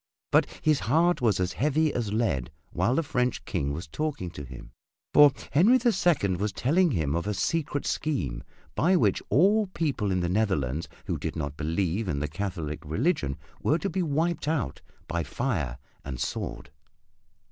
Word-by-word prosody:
But -, -, +4 dB, 0.2 s
his 155 Hz, -2 st, +3 dB
heart 170 Hz, +1 st, +2 dB
was 110 Hz, -6 st, +2 dB
as 90 Hz, 0 st, 0 dB
heavy 150 Hz, +2 st, +1 dB
as 115 Hz, -4 st, -2 dB
lead 85 Hz, -, 0 dB, 0.2 s
while 95 Hz, +9 st, +1 dB
the 165 Hz, -, +2 dB
French 125 Hz, -5 st, -1 dB
King 70 Hz, 0 st, -1 dB
was 80 Hz, +4 st, -5 dB
talking 135 Hz, -, -3 dB
to 75 Hz, -4 st, -8 dB
him, 65 Hz, -2 st, -11 dB, 0.4 s
for 145 Hz, -1 st, +8 dB, 0.2 s
Henry 190 Hz, -, +6 dB
the 240 Hz, -1 st, +3 dB
Second 160 Hz, -, +2 dB
was 105 Hz, +1 st, 0 dB
telling 170 Hz, -, +2 dB
him 80 Hz, -, 0 dB
of 85 Hz, +4 st, -2 dB
a 105 Hz, -, -1 dB
secret 150 Hz, -, -1 dB
scheme 70 Hz, -, -2 dB, 0.3 s
by 180 Hz, +4 st, +3 dB
which 105 Hz, -, +2 dB
all 200 Hz, -, +4 dB
people 145 Hz, -, -1 dB
in 90 Hz, -1 st, +1 dB
the 85 Hz, -, 0 dB
Netherlands 85 Hz, -, 0 dB, 0.2 s
who -, -, -2 dB
did -, -, -4 dB
not 70 Hz, -2 st, -3 dB
believe 85 Hz, +6 st, -1 dB
in 75 Hz, -, -1 dB
the 75 Hz, +1 st, -1 dB
Catholic 85 Hz, -3 st, -4 dB
religion 75 Hz, -, 0 dB, 0.2 s
were 155 Hz, -, +2 dB
to 195 Hz, +3 st, -3 dB
be 190 Hz, -, 0 dB
wiped 160 Hz, 0 st, 0 dB
out 140 Hz, -, -1 dB, 0.3 s
by 85 Hz, 0 st, -1 dB
fire 85 Hz, -, -2 dB, 0.3 s
and 65 Hz, -3 st, -6 dB
sword. 70 Hz, -, -4 dB
105 Hz, 175 wpm, -27 LUFS, -, 0.4 s, for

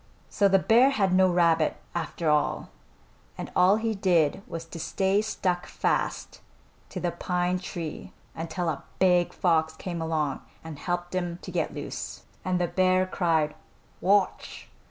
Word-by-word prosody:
So 200 Hz, -, +3 dB
the 195 Hz, 0 st, +5 dB
bear 235 Hz, +7 st, +5 dB
had 200 Hz, -9 st, +1 dB
no 185 Hz, 0 st, +5 dB
rabbit, 165 Hz, -3 st, +2 dB, 0.2 s
after 170 Hz, 0 st, -3 dB
all, 150 Hz, -1 st, +1 dB, 0.7 s
and -, -, -6 dB
all 185 Hz, +3 st, +5 dB
he 225 Hz, 0 st, -1 dB
did 180 Hz, -4 st, +2 dB
was 165 Hz, 0 st, -6 dB
to 165 Hz, 0 st, -9 dB
stay 190 Hz, +5 st, +1 dB
stuck 180 Hz, -5 st, -2 dB
fast -, -, -2 dB, 0.5 s
to -, -, -5 dB
the 175 Hz, -, -1 dB
pine 180 Hz, +1 st, -1 dB
tree 170 Hz, -4 st, -6 dB, 0.2 s
until 165 Hz, +2 st, -4 dB
a 140 Hz, -3 st, -4 dB
big 180 Hz, -2 st, +3 dB
fox 160 Hz, -3 st, +1 dB
came 170 Hz, 0 st, -5 dB
along 155 Hz, -4 st, -1 dB, 0.2 s
and 160 Hz, -3 st, -8 dB
helped 175 Hz, +2 st, -3 dB
him 175 Hz, -2 st, -2 dB
to -, -, -7 dB
get -, -, -2 dB
loose, -, -, -6 dB, 0.2 s
and 185 Hz, -1 st, 0 dB
the 175 Hz, -, +2 dB
bear 185 Hz, +1 st, +2 dB
cried 165 Hz, -5 st, +1 dB, 0.5 s
"Wouch!" 200 Hz, +1 st, +1 dB
175 Hz, 155 wpm, -27 LUFS, 165-185 Hz, 0.7 s, the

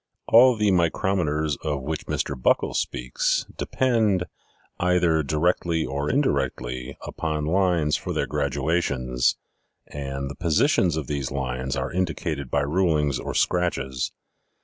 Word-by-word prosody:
All 125 Hz, +2 st, +7 dB
the 105 Hz, -2 st, +2 dB
micrometers 85 Hz, -4 st, +1 dB
of 75 Hz, -4 st, -2 dB
which 80 Hz, +2 st, -4 dB
Mr. -, -, -1 dB
Buckle 65 Hz, -, +1 dB
speaks 60 Hz, 0 st, -1 dB
depend, 110 Hz, -8 st, +1 dB, 0.6 s
either 90 Hz, -3 st, +3 dB
directly 80 Hz, +2 st, 0 dB
or 70 Hz, +1 st, -2 dB
indirectly, 65 Hz, -, -1 dB
upon 75 Hz, -2 st, -3 dB
lines 85 Hz, -3 st, +2 dB
for -, -, -5 dB
their -, -, 0 dB
graduations, 70 Hz, -4 st, 0 dB, 0.5 s
and 70 Hz, -1 st, -5 dB
the 70 Hz, -, -7 dB
positions 85 Hz, -, +2 dB
of 80 Hz, -, -2 dB
these 70 Hz, -1 st, -3 dB
lines 65 Hz, -1 st, -3 dB
are -, -, -2 dB
indicated 80 Hz, -6 st, -2 dB
by 70 Hz, -, +1 dB
rulings 75 Hz, -3 st, +1 dB
or -, -, -5 dB
scratches. 65 Hz, -8 st, 0 dB
75 Hz, 125 wpm, -24 LUFS, 70-90 Hz, 0.6 s, All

